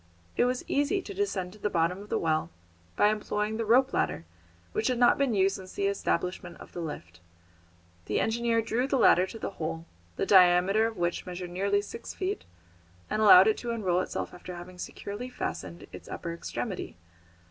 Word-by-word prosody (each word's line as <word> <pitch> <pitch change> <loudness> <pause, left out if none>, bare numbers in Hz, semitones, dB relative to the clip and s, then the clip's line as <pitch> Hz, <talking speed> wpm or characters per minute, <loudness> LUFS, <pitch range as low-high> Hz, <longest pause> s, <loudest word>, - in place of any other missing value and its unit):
It - - +3
was 250 0 -1
easy 290 +7 +1
to 400 - -7
descend 200 - -2
to 215 - -15
the 210 - -1
bottom 170 +1 +1
of 205 - -12
the - - +1
well 155 -1 0 0.5
by 205 - +4
employing 210 0 -1
the 230 - -2
rope 255 +5 +4
ladder 80 - -1 0.5
which 220 - 0
had 250 -1 +1
not 240 +2 +4
been 270 -5 +2
used 195 0 +2
since 185 -1 -11
the 200 - -1
establishment 180 -3 -2
of - - -13
the - - -7
lift. 90 - -7 0.9
The - - 0
engineer 230 0 +1
drew 235 +3 0
the 275 - +1
ladder 185 -6 +5
to 225 - -8
the 220 - -4
hole, 165 +1 -3 0.3
the - - -1
diameter 190 +3 +5
of 225 - -7
which 175 0 -2
measured 180 0 -6
nearly 200 +3 +1
six 460 - -8
feet, 390 +1 -3 0.7
and 215 - 0
allowed 195 -3 +9
it 220 - +3
to 240 - -5
unroll 190 -6 +1
itself - - -4
after 180 0 -8
having 180 +1 -10
securely 205 +7 -6
fastened 90 - -5
its - - -11
upper 170 - -5
extremity. 180 - -5
200 Hz, 190 wpm, -28 LUFS, 180-230 Hz, 0.9 s, allowed